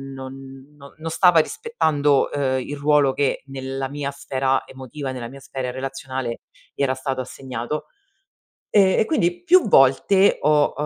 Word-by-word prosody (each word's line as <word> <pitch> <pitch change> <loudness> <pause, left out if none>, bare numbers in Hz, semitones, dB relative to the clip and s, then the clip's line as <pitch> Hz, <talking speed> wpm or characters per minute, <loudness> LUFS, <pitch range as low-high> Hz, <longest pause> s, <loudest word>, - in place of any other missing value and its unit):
non 135 +1 -11
non 150 +3 -9
stava 170 +1 +5
rispettando, 155 - +1
ehm, 130 -2 0
il 145 +3 -6
ruolo 145 -1 +3
che 140 -2 -1
nella 135 0 -5
mia 145 0 -4
sfera 135 -1 -1
emotiva, 130 +1 -7
nella 125 -2 -6
mia 135 +2 -11
sfera 130 -1 -5
relazionale 130 -2 -5 0.3
gli - - -6
era 130 -1 +1
stato 130 0 -3
assegnato. 130 +2 -6 0.8
Ehm, 195 -3 +4
e - - +3
quindi 350 +5 0
più 360 -3 +5
volte 190 +6 +4
ho, 150 0 +3
uhm, 150 - -3
135 Hz, 150 wpm, -22 LUFS, 130-150 Hz, 0.8 s, stava